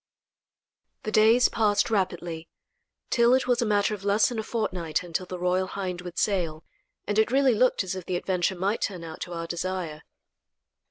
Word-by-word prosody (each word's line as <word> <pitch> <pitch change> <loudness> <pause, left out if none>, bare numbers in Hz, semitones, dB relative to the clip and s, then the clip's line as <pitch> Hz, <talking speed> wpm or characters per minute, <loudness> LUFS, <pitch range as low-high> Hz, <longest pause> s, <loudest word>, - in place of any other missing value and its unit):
The 215 - -3
days 225 +3 +5
passed 210 0 +1
rapidly, 175 -5 -2 0.6
till 235 +1 +5
it 260 - +1
was 245 -1 +2
a 235 - +1
matter 205 0 +2
of 200 -2 -7
less 205 +1 +3
than 240 -3 -4
a - - -2
fortnight 180 -8 -2
until 180 +1 -4
the 180 - -5
Royal 180 +1 0
Hind 185 -2 -4
would 180 -1 -9
sail, 170 -6 0 0.4
and 205 +1 0
it 220 - +3
really 265 0 +4
looked 250 -1 +2
as 185 - -4
if 185 -2 -7
the 185 - -1
adventure 185 +1 0
might 195 +5 -1
turn 180 -4 -3
out 160 -1 -9
to 175 - -5
our 165 0 -4
desire. 170 -2 -4
190 Hz, 185 wpm, -26 LUFS, 175-215 Hz, 0.6 s, days